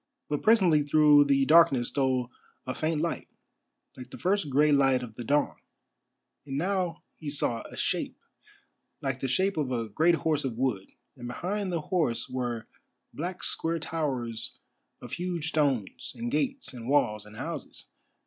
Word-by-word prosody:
But 145 -1 -1
presently 190 -9 +5
through 145 0 +6
the 135 -1 +3
darkness 140 -5 +5
stole 130 -3 0 0.3
a 130 - -2
faint 155 +1 -1
light, 170 0 -2 0.7
like 125 - -10
the - - -9
first 190 -4 0
grey 150 +3 +4
light 135 -3 +4
of 115 -3 -8
the 120 - -7
dawn, 145 +5 +1 0.9
and 135 -1 -4
now 180 +1 -1
he 155 - -5
saw 120 -5 -1
a - - -11
shape, - - -1 0.8
like 135 -1 -2
the 135 - -2
shape 190 +9 +1
of 140 -4 -1
a 115 -3 -2
great 165 +10 +3
horse 155 -3 0
of 125 -4 -3
wood, 120 -7 -1 0.3
and 120 -2 -8
behind 190 +9 -3
the 170 -2 -1
horse 155 -8 0
were 120 -3 -3 0.5
black 180 +4 -5
square 165 +1 -1
towers 130 -9 -3 0.5
of - - -9
huge 175 -3 -2
stones, 140 -10 -1
and 240 +1 -3
gates, 270 - -1
and 120 -1 -7
walls, 110 -7 +2
and 105 - -13
houses. - - -6
145 Hz, 160 wpm, -28 LUFS, 125-165 Hz, 0.9 s, through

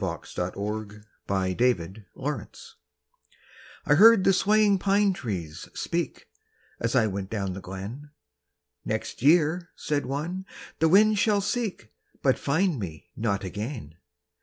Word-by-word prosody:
WHAT 85 -4 -3
THE 105 +3 -4 0.2
PINE 95 -2 0
TREES 105 -6 +1 0.2
SAID 145 +3 -6 1.0
I - - +4
heard 210 +5 +7
the 195 - +5
swaying 205 0 +3
pine 200 +1 +3
trees 90 - -5
speak, - - -3 0.5
As 115 +2 -1
I 120 -3 +5
went 100 -2 -3
down 100 -4 -2
the 95 - -7
glen: 100 +11 -7 0.7
"Next - - -4
year," 165 +4 +3
said 145 -4 -2
one, 170 +8 -4 0.3
"the 160 - +4
wind 210 +3 +5
shall 210 -1 +3
seek, 200 - -3 0.3
But 130 -2 +3
find 160 +1 +1
me 80 -7 -7
not 105 -2 -1
again!" 105 - -5
130 Hz, 130 wpm, -26 LUFS, -, 1.0 s, heard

